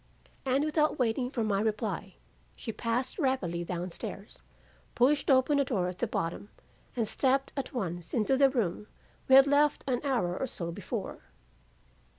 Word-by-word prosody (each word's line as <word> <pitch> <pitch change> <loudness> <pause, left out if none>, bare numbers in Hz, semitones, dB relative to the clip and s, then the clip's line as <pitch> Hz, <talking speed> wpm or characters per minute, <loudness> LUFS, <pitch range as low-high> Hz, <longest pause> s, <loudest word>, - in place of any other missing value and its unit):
"And 265 +2 +2
without 305 0 +1
waiting 245 0 0
for 240 -3 -2
my 205 -2 +1
reply, 210 -3 -2 0.4
she 225 - -5
passed 240 - -2
rapidly 195 - 0
down 175 +1 -4
stairs, 195 +4 -8 0.5
pushed 280 +5 +3
open 270 +2 +4
a - - +4
door 205 -9 -1
at 180 0 -6
the 240 - 0
bottom, 200 -1 -3 0.5
and 230 -3 0
stepped 270 +4 +1
at 275 - -3
once 175 - -4
into 235 +3 +2
the 275 0 +5
room 210 -6 -2 0.4
we 265 - +7
had 270 0 +9
left 290 +1 +3
an 250 -2 0
hour 235 -11 0
or 265 - -2
so 170 -9 -3
before. - - -5
240 Hz, 165 wpm, -30 LUFS, 195-270 Hz, 0.5 s, had